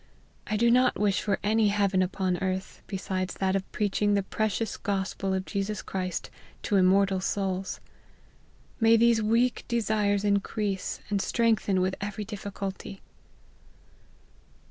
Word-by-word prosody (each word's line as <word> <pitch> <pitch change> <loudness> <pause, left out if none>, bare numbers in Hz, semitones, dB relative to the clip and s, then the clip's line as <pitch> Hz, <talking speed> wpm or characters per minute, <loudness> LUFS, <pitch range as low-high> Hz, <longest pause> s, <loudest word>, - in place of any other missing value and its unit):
I 215 - 0
do 235 +2 +4
not 250 +1 +3
wish 205 -2 +2
for 200 -2 0
any 215 +1 +3
heaven 200 -2 +2
upon 185 0 0
earth 190 0 -3
besides 185 -1 -3
that 190 0 0
of 195 -1 -3
preaching 205 0 +1
the 200 - +1
precious 215 +2 -1
Gospel 195 -1 -2
of 190 0 -1
Jesus 200 +5 -3
Christ 185 -2 -4 0.3
to 205 - 0
immortal 190 0 +4
souls. 190 -1 -2 1.0
May 225 0 +6
these 230 0 +4
weak 230 +3 +2
desires 210 -3 +1
increase 200 -1 -1
and 200 -1 +1
strengthen 220 -5 +1
with 185 +1 +1
every 205 +1 -4
difficulty." 200 -1 -6
200 Hz, 130 wpm, -27 LUFS, 190-215 Hz, 1.0 s, May